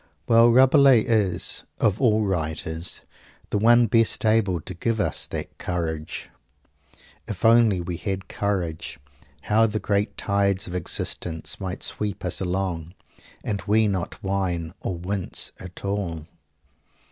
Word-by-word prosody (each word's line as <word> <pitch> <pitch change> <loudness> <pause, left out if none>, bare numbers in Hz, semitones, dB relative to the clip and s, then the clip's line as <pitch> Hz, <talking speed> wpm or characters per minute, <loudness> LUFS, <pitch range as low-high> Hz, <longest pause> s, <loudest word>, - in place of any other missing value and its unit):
_ - - -35 0.2
Well, 115 +1 +6
Rabelais 130 0 +6
is, 100 -6 0 0.2
of 110 +2 +1
all 110 -4 +3
writers, 80 -2 -2 0.5
the 105 - +1
one 120 +2 +6
best 115 +1 +2
able 110 -5 +2
to 90 - -8
give 110 +6 -1
us - - 0
that - - -6
courage. 80 -3 -4 1.0
If - - -4
only 115 -5 +5
we 85 0 -4
had 95 -2 -4
courage, 90 -6 -3 0.4
how 110 +2 +3
the 110 0 -2
great 100 0 -1
tides 100 -2 +1
of 90 - -7
existence 85 -1 -3
might 95 -1 -5
sweep 105 -3 -2
us 90 - -1
along 90 -2 -3 0.5
and 100 -2 -2
we 110 +1 +4
not 95 -4 -3
whine 90 -4 -2
or 90 - -3
wince 95 +2 -1
at 95 +1 -9
all! 90 -6 -3
100 Hz, 135 wpm, -24 LUFS, 90-110 Hz, 1.0 s, Well